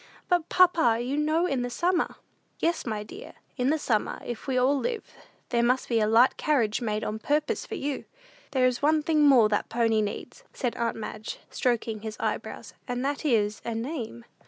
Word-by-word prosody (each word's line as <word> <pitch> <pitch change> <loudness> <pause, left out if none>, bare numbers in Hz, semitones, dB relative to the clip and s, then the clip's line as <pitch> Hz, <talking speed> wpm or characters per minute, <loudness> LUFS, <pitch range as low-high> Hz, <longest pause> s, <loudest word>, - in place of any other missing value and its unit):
"But, 350 -2 +1
papa, 335 -11 +4
you 250 +4 -2
know 310 +3 +2
in 275 -8 0
the 245 - -2
summer!" 345 +8 0 0.4
"Yes, 335 -5 -1
my 215 -2 -2
dear, 390 - -10 0.2
in 255 0 +1
the 315 - +2
summer, 225 -8 -1
if 240 +2 -6
we 260 -1 0
all 260 +3 +3
live, 450 - -3 0.4
there 235 -2 +2
must 250 +2 +2
be 230 -2 +2
a 215 - +2
light 230 +4 +5
carriage 240 -9 +1
made 215 -2 -1
on 215 +1 -3
purpose 295 +6 -1
for - - -5
you." 280 -1 -3 0.4
"There 260 -2 +2
is 250 -1 +1
one 305 +1 +3
thing 310 -1 +2
more 265 -7 +7
that 205 - 0
pony 225 -1 +2
needs," 210 - -5
said 245 -3 -2
aunt 230 -1 -1
Madge, 215 0 -6
stroking 230 -3 -1
his 215 0 -6
eyebrows, - - -4
"and 245 +1 -2
that 285 +1 -2
is, 215 -6 +1
a 230 -1 -3
name." 225 - -5
250 Hz, 195 wpm, -27 LUFS, 225-300 Hz, 0.4 s, more